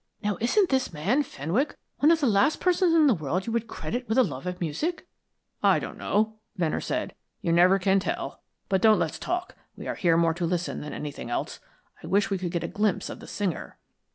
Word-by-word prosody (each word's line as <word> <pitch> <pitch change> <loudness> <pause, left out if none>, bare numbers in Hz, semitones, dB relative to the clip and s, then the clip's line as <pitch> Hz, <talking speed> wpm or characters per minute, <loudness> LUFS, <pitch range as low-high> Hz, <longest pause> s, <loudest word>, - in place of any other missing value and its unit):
"Now 205 -1 0
isn't 360 - +3
this 265 -1 +1
man 190 - +1
Fenwick 195 - -2 0.2
one 295 - +5
of 330 -1 +4
the - - +3
last 215 +5 +3
persons 360 -2 +3
in 320 -2 +6
the 275 - +5
world 170 +2 -2
you 230 - -3
would 230 -1 -1
credit 245 +2 -5
with 220 - +1
a 260 - +7
love 145 - -5
of 180 0 -4
music?" 175 - -2 0.5
"I - - +5
don't - - -5
know," 215 +1 0 0.2
Venner 165 -4 0
said. - - -2 0.3
"You 170 - +1
never 180 +3 +6
can 195 +1 +3
tell. 345 - -4 0.3
But 190 -2 +1
don't 220 0 +6
let's 160 - -2
talk. 355 +1 -3 0.2
We - - -8
are - - -1
here 170 -3 +2
more 165 -1 +3
to 175 +1 -2
listen 175 0 -2
than 150 - -6
anything 145 -5 -6
else. 120 - -3 0.4
I - - -9
wish 200 +1 +2
we 195 - 0
could 180 -1 -2
get 170 -2 -2
a - - -2
glimpse 210 +2 0
of - - -8
the - - -11
singer." 195 -5 -3
200 Hz, 225 wpm, -27 LUFS, 170-260 Hz, 0.5 s, a